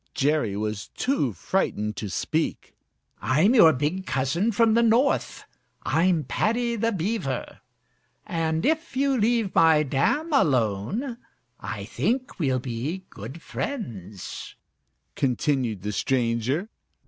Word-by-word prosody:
Jerry 140 -8 +1
was 105 -1 -3
too 250 - +1
frightened 105 - -1
to 105 - -4
speak. 155 - -2 0.5
"I'm 155 - +3
your 170 -10 +8
big 155 +7 -2
cousin 150 - +1
from 225 +1 +3
the 230 - +4
North; 235 +5 +2 0.4
I'm 170 -1 +2
Paddy 235 - 0
the 230 +1 0
Beaver, 180 - -3 0.7
and 160 -1 -1
if 315 -2 0
you 275 0 +2
leave 225 -3 +1
my 160 -2 +5
dam 220 - 0
alone, 145 - +1 0.4
I 100 +1 -5
think 220 - -2
we'll 135 -5 +1
be 130 +9 -4
good 160 +5 -9
friends," 110 - -6 0.6
continued 125 -5 0
the 105 - -2
stranger. 125 - 0
160 Hz, 115 wpm, -25 LUFS, -, 0.7 s, your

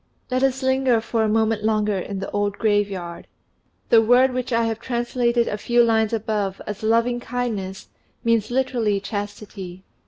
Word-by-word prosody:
Let 255 0 +1
us 265 0 +1
linger 260 -2 +3
for 225 0 -1
a 220 - +2
moment 220 0 +1
longer 215 -2 +1
in 195 +2 -5
the 195 - -5
old 205 -1 -1
graveyard. 200 -5 -1 0.6
The 230 - +7
word 250 +3 +4
which 255 0 -3
I 230 0 +2
have 225 -1 -2
translated 240 0 0
a 210 - -3
few 240 +2 +3
lines 220 -2 +2
above 210 -3 -2
as 210 -1 -6
"loving 230 +2 +2
faithfulness" 225 -6 -4 0.4
means 230 -3 +2
literally 240 -5 0
"chastity." 200 -2 -6
220 Hz, 160 wpm, -22 LUFS, 205-240 Hz, 0.6 s, The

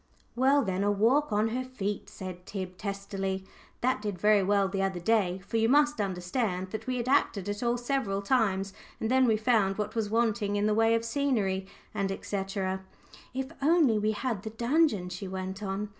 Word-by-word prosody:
"Well, 270 +3 +4
then, 190 -1 -1
a 205 - +2
walk 235 +8 +3
on 210 +2 +2
her 250 +3 -2
feet," 210 -6 -4
said 180 -1 -8
Tib, 185 -2 -5
testily; 195 -1 -3 0.4
"that 255 -3 +1
did 205 -3 -3
very 210 +2 +4
well 200 0 +2
the 195 0 -2
other 190 -2 -1
day," 190 -1 +1
for 225 - -2
you 225 0 +3
must 295 -1 +4
understand 185 0 -2
that 220 +1 -5
we 255 0 -1
had 240 0 -3
acted 215 -8 +2
it 205 0 -3
all 240 0 +1
several 240 -6 -1
times, 195 -5 +1 0.3
and 225 - -1
then 260 0 +5
we 220 -2 +3
found 215 -4 +2
what 210 0 -2
was 220 -3 -1
wanting 215 -2 +1
in 205 0 +1
the 215 - +3
way 225 +1 +4
of 230 0 -1
scenery, 225 -8 0 0.3
&c. 195 0 -2 1.0
"If 265 +2 -3
only 290 -7 +4
we 215 +1 +1
had 225 -2 -2
the 220 - -5
dungeon," 235 - +1
she 180 +2 -6
went 190 +1 -5
on. 200 +1 -3
210 Hz, 190 wpm, -29 LUFS, 195-240 Hz, 1.0 s, then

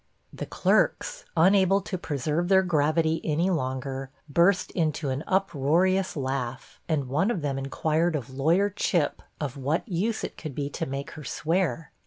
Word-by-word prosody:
The - - -6
clerks, - - +1
unable 190 +3 +5
to 190 - -5
preserve 155 0 -1
their 190 0 +5
gravity 160 -1 +1
any 165 +4 +1
longer, 135 -3 -3 0.2
burst 175 +5 +3
into 155 -4 -1
an 130 +3 -2
uproarious 185 +1 +2
laugh; 130 -2 -4
and 145 -5 0
one 155 - +1
of 185 -10 -2
them 135 -2 -1
inquired 155 +4 0
of 130 -3 -4
lawyer 165 +10 +2
Chip 175 -6 0 0.2
of 145 -2 -4
what 145 - -1
use 210 +4 -1
it - - -5
could 155 -5 -6
be 145 -1 -3
to - - -3
make 135 +1 -5
her 150 - -9
swear. 165 +4 -1
160 Hz, 160 wpm, -26 LUFS, 140-185 Hz, 0.2 s, unable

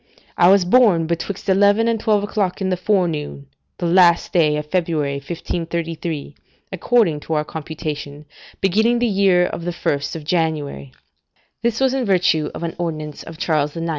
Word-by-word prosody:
I 175 - +5
was 195 -1 +5
born 190 -5 +4
betwixt 170 +4 -4
eleven 205 +3 +3
and 230 -1 0
twelve 210 -2 +1
o'clock 205 -3 -2
in 190 -1 -1
the 185 - +1
forenoon 175 -7 -1 0.3
the 175 - -3
last 170 0 +4
day 155 -4 +3
of 150 - -4
February 155 -4 -1
1533, 165 0 -4 0.4
according 190 -4 +1
to 160 - -5
our 150 0 0
computation, 150 -2 -6 0.4
beginning 220 +5 +2
the 240 - +1
year 195 -4 +3
the 170 +1 -5
1st 145 -4 -2
of 160 - -6
January, 150 - -2 0.7
[This 235 -1 0
was 265 -1 +2
in 270 -1 0
virtue 175 -6 +2
of - - -6
an 165 - -3
ordinance 155 -3 -4
of 165 - -10
Charles 155 -2 -1
IX. 165 0 -3
170 Hz, 165 wpm, -20 LUFS, 155-195 Hz, 0.7 s, I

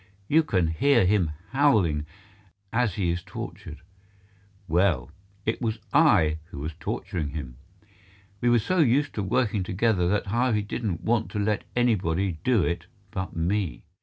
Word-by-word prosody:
You 160 +2 +5
can 95 - +1
hear 110 - +3
him 95 -3 +2 0.2
howling 105 - +2 0.7
as 115 -5 +1
he 90 -4 0
is 85 +1 -2
tortured. 80 -2 -8 0.9
Well, 80 -7 +1 0.3
it 110 +2 -1
was 115 -2 -1 0.2
I 90 - +4
who 85 - -11
was 75 +3 -4
torturing 75 0 -3
him. 65 -5 -7 0.8
We 120 - +3
are 120 - +5
so 180 - 0
used 145 0 +3
to 105 - -2
working 110 +1 +1
together 95 -1 +1
that 105 +3 +1
Harvey 115 0 +1
didn't 100 -4 -3
want 115 -1 +1
to - - -2
let 105 0 0
anybody 95 -7 +1
do 125 -7 +3
it 85 0 -2 0.2
but 95 -3 -4
me. 90 +2 -1
100 Hz, 150 wpm, -26 LUFS, 85-115 Hz, 0.9 s, You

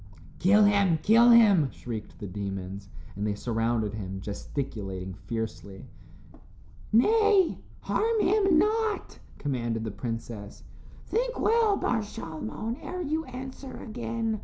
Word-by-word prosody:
"Kill 205 +4 +5
him, 200 -5 +4
kill 230 +3 +6
him," 205 - +6
shrieked 115 -4 -7
the - - -7
demons, 95 0 -5 0.3
and 105 +2 -2
they 105 - -1
surrounded 115 -1 -1
him, 95 -3 -5
gesticulating 100 -3 -5
fiercely. 105 -2 -6 1.1
"Nay, 415 - +4 0.2
harm 450 0 +1
him 390 -4 +3
not," 435 +3 0 0.2
commanded 120 -5 -2
the 110 - -3
princess. 115 -1 -6 0.4
"Think - - -1
well, 445 -3 +3
Bar 235 - +1
Shalmon, 205 - -5
ere 360 0 -4
you 315 +1 -1
answer 260 0 -8
again. 225 -1 -3
185 Hz, 115 wpm, -28 LUFS, -, 1.1 s, kill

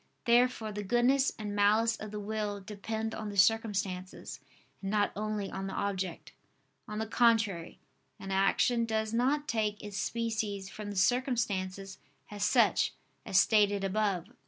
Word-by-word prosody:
Therefore 240 -2 +3
the 210 0 -4
goodness 245 +6 +2
and 210 -2 -5
malice 215 +3 +3
of 215 - -8
the 210 0 -5
will 210 -1 -3
depend 220 +3 -4
on 215 -1 -5
the 200 - -7
circumstances, 195 -3 0 0.4
and 195 - -4
not 205 0 +1
only 210 -1 -3
on 195 0 -4
the 195 - -5
object. 190 -3 -3 0.6
On 210 -1 -5
the 220 - -1
contrary, 225 -7 +2 0.4
An 195 - -7
action 215 +5 +2
does 220 -1 -1
not 275 +5 +1
take 215 -2 -1
its 205 -2 -6
species 215 -4 -2
from 210 +1 -7
the 205 - -6
circumstances 195 -4 0 0.3
as 205 -1 -4
such, 210 - +3 0.3
as 190 - +4
stated 205 -2 +3
above 195 -2 0
(Q. 235 - -22
210 Hz, 155 wpm, -31 LUFS, 195-225 Hz, 0.6 s, as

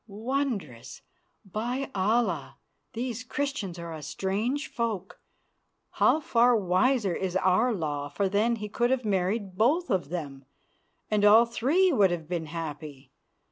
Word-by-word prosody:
Wondrous! 215 - -4 0.4
By 240 +8 -3
Allah! 195 - 0 0.4
these 245 0 -4
Christians 265 - -3
are 170 -1 -6
a 155 - -7
strange 205 - -2
folk. 220 -5 -4 0.7
How - - +3
far 245 -4 +3
wiser 205 +2 +2
is 185 -1 -3
our 190 +6 +3
law, 145 -7 -3
for 195 +8 -1
then 210 +5 +1
he 210 -2 -6
could 240 +3 0
have 260 -2 0
married 195 0 -1
both 305 +11 +2
of 180 -7 0
them, 145 -6 -5 0.7
and 210 -1 +2
all 215 +3 +7
three 285 +11 +2
would 200 -7 +4
have 170 -3 -4
been 170 -2 -3
happy. 150 -4 -7
205 Hz, 140 wpm, -27 LUFS, 175-240 Hz, 0.7 s, all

